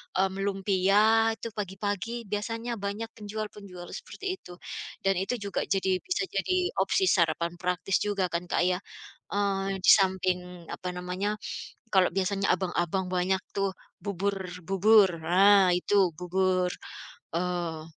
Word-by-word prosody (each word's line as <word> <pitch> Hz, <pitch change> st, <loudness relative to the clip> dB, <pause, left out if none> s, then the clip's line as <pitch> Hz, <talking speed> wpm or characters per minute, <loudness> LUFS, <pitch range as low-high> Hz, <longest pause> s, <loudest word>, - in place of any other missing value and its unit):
mmm, 190 Hz, +1 st, +1 dB
lumpia 200 Hz, +3 st, +3 dB
itu 230 Hz, -, -6 dB
pagi-pagi 205 Hz, +2 st, -3 dB, 0.2 s
biasanya 230 Hz, +3 st, -3 dB
banyak 205 Hz, +3 st, -4 dB
penjual-penjual 205 Hz, -4 st, -7 dB
seperti 390 Hz, -, -9 dB
itu 180 Hz, -, -12 dB, 0.5 s
dan 195 Hz, 0 st, +3 dB
itu 195 Hz, +6 st, -1 dB
juga 200 Hz, -, -2 dB
jadi 190 Hz, -1 st, +1 dB
bisa 365 Hz, +1 st, 0 dB
jadi 370 Hz, -, 0 dB, 0.2 s
opsi 385 Hz, -, +2 dB
sarapan 170 Hz, -1 st, +1 dB
praktis 180 Hz, +2 st, +1 dB
juga 200 Hz, -3 st, 0 dB
kan 170 Hz, +1 st, -1 dB
Kak -, -, +2 dB
ya? 180 Hz, -, +1 dB, 0.6 s
Eee, 195 Hz, -1 st, 0 dB
di -, -, +8 dB
samping 185 Hz, -1 st, +1 dB, 0.3 s
apa 185 Hz, -, -6 dB
namanya, 185 Hz, +4 st, -2 dB, 0.6 s
kalo 190 Hz, -2 st, +5 dB
biasanya 195 Hz, +1 st, 0 dB
abang-abang 185 Hz, 0 st, -1 dB
banyak 185 Hz, +1 st, +2 dB, 0.2 s
tuh 195 Hz, -1 st, +1 dB, 0.3 s
bubur-bubur 195 Hz, +1 st, +3 dB, 0.2 s
nah 190 Hz, +2 st, +6 dB
itu 180 Hz, -, -1 dB, 0.2 s
bubur, 185 Hz, 0 st, +1 dB, 0.7 s
oh, 175 Hz, -2 st, -2 dB
195 Hz, 125 wpm, -28 LUFS, 180-205 Hz, 0.7 s, di